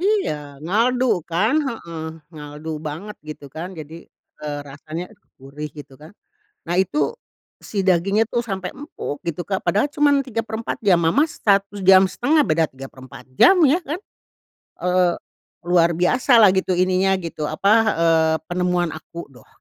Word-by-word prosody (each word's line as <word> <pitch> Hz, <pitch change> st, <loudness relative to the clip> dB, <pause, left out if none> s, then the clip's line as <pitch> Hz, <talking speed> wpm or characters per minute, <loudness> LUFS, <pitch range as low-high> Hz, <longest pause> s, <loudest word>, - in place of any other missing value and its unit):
Iya, 405 Hz, -, +1 dB, 0.3 s
ngaldu 235 Hz, +8 st, +1 dB, 0.3 s
kan. 205 Hz, -, +1 dB
Heeh. 170 Hz, -9 st, -7 dB, 0.3 s
Ngaldu 150 Hz, +1 st, -8 dB, 0.2 s
banget, 190 Hz, +8 st, -7 dB
gitu 150 Hz, -, -8 dB
kan. 170 Hz, +3 st, -6 dB
Jadi, 155 Hz, +1 st, -9 dB, 0.5 s
eee, 150 Hz, -1 st, -4 dB
rasanya, 155 Hz, +5 st, -7 dB
aduh 205 Hz, -, -26 dB
gurih, 145 Hz, +3 st, -7 dB
gitu 145 Hz, -, -11 dB
kan. 155 Hz, +2 st, -12 dB, 0.6 s
Nah, 175 Hz, -, 0 dB
itu 190 Hz, +10 st, -1 dB, 0.7 s
si 205 Hz, -, -1 dB
dagingnya 195 Hz, +4 st, +3 dB
tuh 240 Hz, -, -1 dB
sampai 190 Hz, -4 st, -4 dB
empuk, 290 Hz, -, -6 dB
gitu 170 Hz, 0 st, -3 dB
Kak. 190 Hz, -2 st, -2 dB
Padahal 210 Hz, +8 st, +2 dB
cuma 290 Hz, 0 st, +2 dB
3/4 225 Hz, -3 st, -4 dB
jam, 185 Hz, -4 st, +5 dB
mamah 170 Hz, -, +3 dB
1.5 200 Hz, +6 st, +3 dB
beda 160 Hz, -5 st, +2 dB
3/4 130 Hz, -1 st, -12 dB
jam, 380 Hz, 0 st, +7 dB
iya 295 Hz, +4 st, +4 dB
kan? 320 Hz, 0 st, -5 dB, 0.8 s
Eee, 180 Hz, -1 st, +2 dB, 0.5 s
luar 170 Hz, -1 st, +3 dB
biasalah 215 Hz, -, +5 dB
gitu, 190 Hz, -1 st, 0 dB
ininya 185 Hz, +1 st, +2 dB
gitu, 160 Hz, -3 st, -4 dB
apa, 155 Hz, +6 st, -1 dB, 0.3 s
eee, 160 Hz, -1 st, +3 dB, 0.2 s
penemuan 180 Hz, -1 st, 0 dB
aku 160 Hz, 0 st, -9 dB
doh. 125 Hz, -, -18 dB
180 Hz, 140 wpm, -21 LUFS, 160-215 Hz, 0.8 s, jam